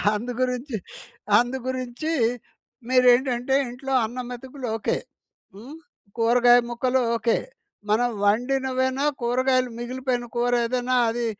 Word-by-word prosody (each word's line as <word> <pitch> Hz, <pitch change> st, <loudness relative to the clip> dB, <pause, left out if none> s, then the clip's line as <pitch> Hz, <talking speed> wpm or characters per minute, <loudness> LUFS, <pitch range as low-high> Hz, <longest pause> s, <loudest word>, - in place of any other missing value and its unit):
అందుగురించి, 250 Hz, +2 st, -3 dB, 0.6 s
అందుగురించీ 255 Hz, +4 st, -3 dB, 0.8 s
మీరేంటంటే 250 Hz, 0 st, +3 dB
ఇంట్లో 265 Hz, +2 st, -5 dB
అన్నం 245 Hz, +2 st, -6 dB
మెతుకులు 255 Hz, +1 st, -7 dB
ఓకే. 215 Hz, -, -1 dB, 0.6 s
హ్మ్. 250 Hz, +10 st, -11 dB, 0.4 s
కూరగాయ 240 Hz, +1 st, +5 dB
ముక్కలు 250 Hz, +2 st, 0 dB, 0.2 s
ఓకే. 230 Hz, 0 st, +1 dB, 0.5 s
మనం 235 Hz, +3 st, +2 dB, 0.2 s
వండినవేనా 260 Hz, +4 st, +1 dB, 0.2 s
కూరగాయలు 255 Hz, +1 st, +1 dB
మిగిలిపోయిన 250 Hz, 0 st, -3 dB
కూరేదేనా 245 Hz, +1 st, +1 dB
అది 235 Hz, +1 st, -2 dB
250 Hz, 90 wpm, -24 LUFS, 240-260 Hz, 0.8 s, కూరగాయ